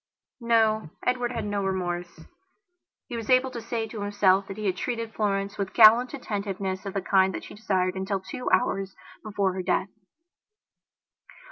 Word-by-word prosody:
No, 220 -5 +2 0.2
Edward 250 -1 0
had 230 -3 -3
no 205 -1 -2
remorse. 175 -3 -3 0.9
He 245 - -6
was 225 -2 -6
able 255 0 +4
to 235 - -6
say 230 0 -3
to 220 -1 -7
himself 200 -1 +2
that 195 - -7
he 215 - -4
had 190 -2 +1
treated 230 +2 -4
Florence 200 -1 -1
with 195 -1 -3
gallant 235 +4 +7
attentiveness 200 -5 -4
of 195 - -6
the 195 - -1
kind 190 0 +3
that - - -6
she - - -10
desired 185 -3 0
until 190 +1 -2
two 190 +6 -5
hours 195 -5 +1 0.3
before 200 -3 -1
her 185 - -3
death. 185 +1 0
205 Hz, 165 wpm, -26 LUFS, 190-225 Hz, 0.9 s, gallant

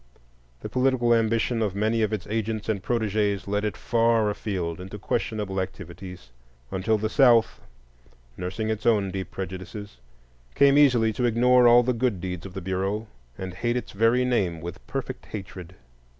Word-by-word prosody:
The - - -5
political 125 -2 +2
ambition 115 +1 +1
of 100 -3 -1
many 110 +2 +1
of 110 -1 +1
its 105 -5 -3
agents 110 0 -2
and 105 -3 -1
protégés 105 -3 0
led 105 +1 -1
it 105 - -2
far 115 -2 +2
afield 90 -5 -4
into 95 +3 -8
questionable 105 -2 -2
activities, 90 -5 -8 0.4
until 105 +4 +1
the 110 +1 -1
South, 120 -2 +4 0.7
nursing 95 +5 -3
its 110 +1 -3
own 105 -4 +3
deep 95 0 -5
prejudices, 95 - -7 0.6
came 140 0 +5
easily 125 -6 +4
to 125 - -1
ignore 125 +1 +5
all 120 +1 +7
the 125 +1 +1
good 115 -5 0
deeds 90 +1 -5
of 90 - -14
the 95 - -4
Bureau 95 +4 -2 0.3
and 95 -1 -6
hate 120 +6 -1
its 125 - -5
very 115 +4 +2
name 95 -10 0
with 85 +2 -8
perfect 130 -1 -5
hatred. 95 -3 -8
110 Hz, 165 wpm, -25 LUFS, 95-115 Hz, 0.7 s, all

